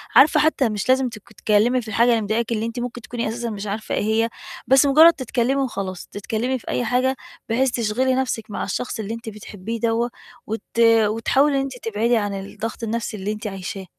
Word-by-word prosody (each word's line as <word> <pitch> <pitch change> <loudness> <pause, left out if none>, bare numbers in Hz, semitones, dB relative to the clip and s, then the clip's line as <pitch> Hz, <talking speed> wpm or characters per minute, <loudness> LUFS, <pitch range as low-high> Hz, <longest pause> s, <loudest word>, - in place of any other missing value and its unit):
عارفة 305 +3 +7
حتى 295 -5 +2
مش 210 +2 -3
لازم 260 0 +3
ت 230 - -9
تتكلمي 220 +5 +1
في 230 - -12
الحاجة 230 +3 +3
اللي 230 -2 +3
مضايقاكِ، 220 +3 -1
اللي 225 -1 0
أنتِ 230 +2 -4
ممكن 245 0 -5
تكوني 235 +1 -4
أساسًا 235 +1 -3
مش 210 -1 -5
عارفة 215 +2 -3
إيه - - 0
هي، 220 +2 +1 0.4
بس 265 +2 +6
مجرد 315 +4 +7
تتكلمي 260 0 0
وخلاص، 195 -8 -4
تتكلمي 225 +5 -2
في - - -20
أي 245 - 0
حاجة 255 +3 +1 0.3
بحيث 255 +3 +2
تشغلي 245 +3 +1
نفْسِك 245 -4 -2
مع - - -3
الشخص 245 +4 -3
اللي 215 +1 -3
أنتِ 230 -1 -6
بتحبيه 210 +1 -7
دوّة، 230 +1 +1 0.4
وت 220 +1 -3 0.2
وتحاولي 230 +5 +4
إن 275 - +2
أنتِ 270 -2 -5
تبعدي 230 +1 0
عن 205 -2 -1
الضغط 205 +4 -6
النفْسي 225 -1 -3
اللي 200 +2 -3
أنتِ 215 +1 -5
عايشاه. 195 -1 -6
230 Hz, 200 wpm, -22 LUFS, 215-250 Hz, 0.4 s, عارفة